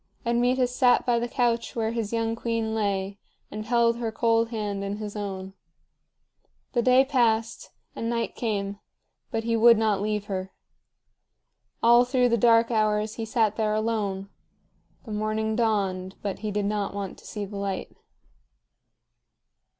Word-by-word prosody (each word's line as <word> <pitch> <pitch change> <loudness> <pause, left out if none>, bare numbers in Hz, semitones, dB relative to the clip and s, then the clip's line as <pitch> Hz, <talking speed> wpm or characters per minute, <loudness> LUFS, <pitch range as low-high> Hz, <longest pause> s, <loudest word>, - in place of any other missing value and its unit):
Admetus 245 +1 +1
sat 250 -2 +4
by 240 -2 +2
the 240 - -2
couch 235 -2 0
where 225 -1 0
his 230 -3 -3
young 225 -1 0
queen 230 -1 -2
lay, 200 -2 -1 0.3
and 215 +1 -6
held 235 -1 +3
her 230 -2 -2
cold 230 0 +2
hand 205 -3 -3
in 200 +1 -3
his 210 -1 -6
own. 195 -2 -5 1.2
The 240 - +2
day 255 +2 +5
passed, 230 -4 +1 0.3
and 230 - -3
night 230 -1 -1
came, 200 -3 -3 0.5
but 225 0 -2
he 230 0 0
would 230 0 +7
not 215 -3 +1
leave 210 0 -1
her. 190 -1 -4 1.3
All 240 +1 +7
through 250 0 +2
the 235 - +3
dark 230 +1 +4
hours 215 -1 +1
he 225 - -3
sat 220 -1 +1
there 215 -1 +1
alone. 210 -3 -2 0.8
The 220 - -8
morning 215 +1 -1
dawned, 195 -5 0
but 200 -2 -3
he 215 - -3
did 205 0 -1
not 205 -1 -2
want 200 -2 -5
to - - -14
see 210 -1 -4
the 200 +1 -8
light. 200 -1 -4
220 Hz, 155 wpm, -26 LUFS, 205-235 Hz, 1.3 s, would